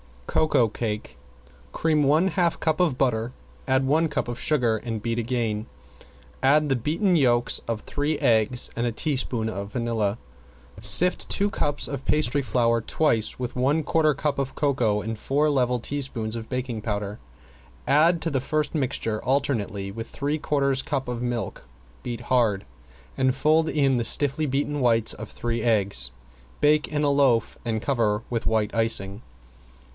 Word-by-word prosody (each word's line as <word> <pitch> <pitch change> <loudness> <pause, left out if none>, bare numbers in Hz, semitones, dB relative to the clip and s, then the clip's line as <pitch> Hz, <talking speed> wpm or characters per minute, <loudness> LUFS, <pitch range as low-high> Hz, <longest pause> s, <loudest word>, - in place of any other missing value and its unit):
~COCOA 125 - +2
CAKE~ 105 -1 -4 0.6
Cream 155 -2 +1
one 155 +7 +3
half 175 -2 +1
cup 160 0 0
of 165 -8 +2
butter, 120 -2 0 0.3
add 130 0 +2
one 155 +4 +2
cup - - -2
of 120 +1 -5
sugar, 125 -9 +1
and 110 -1 -5
beat 115 0 -1
again. 115 -3 -2 0.7
Add 150 +3 +4
the 135 - +2
beaten 165 - +1
yolks 120 -4 +3
of 115 -2 -2
three 145 +1 -2
eggs 120 -2 +3
and 120 +1 -1
a 120 - -2
teaspoon 125 -5 -1
of 100 -1 -6
vanilla. 115 -4 -1 0.6
Sift 180 +1 +2
two 205 +1 +1
cups 145 -5 -1
of 140 -2 -6
pastry 145 -2 +1
flour 115 -3 +1
twice 115 -3 0
with 125 0 -5
one 140 +5 +1
quarter 155 0 +2
cup 140 0 -1
of 135 -1 -3
cocoa 120 -8 +1
and 110 0 -5
four 145 +6 +1
level 125 -3 +1
teaspoons 120 -4 -2
of 110 -1 -8
baking 125 -3 -3
powder. 105 -1 -4 0.7
Add 160 +4 +4
to 165 - -1
the 135 -2 0
first 155 +3 -1
mixture 120 -7 -2
alternately 115 -8 -1
with 115 +3 -7
three 145 +2 -2
quarters 140 -3 +1
cup 135 -3 -3
of 120 -1 -4
milk, 120 -1 -4 0.4
beat 120 -1 -5
hard, 115 -6 +1 0.5
and 130 -1 +2
fold 155 +3 +3
in 135 -4 +2
the 120 - -1
stiffly 145 +4 +2
beaten 145 +1 -1
whites 115 -3 +3
of 110 0 -8
three 115 -1 -3
eggs. 100 - +2 0.5
Bake 150 0 +3
in 150 -1 -2
a 145 - +3
loaf 135 -6 +2
and 110 -2 -1
cover 115 -5 0
with 115 -2 -2
white 110 -1 +1
icing. 110 -3 +1
125 Hz, 160 wpm, -25 LUFS, 115-145 Hz, 0.7 s, Add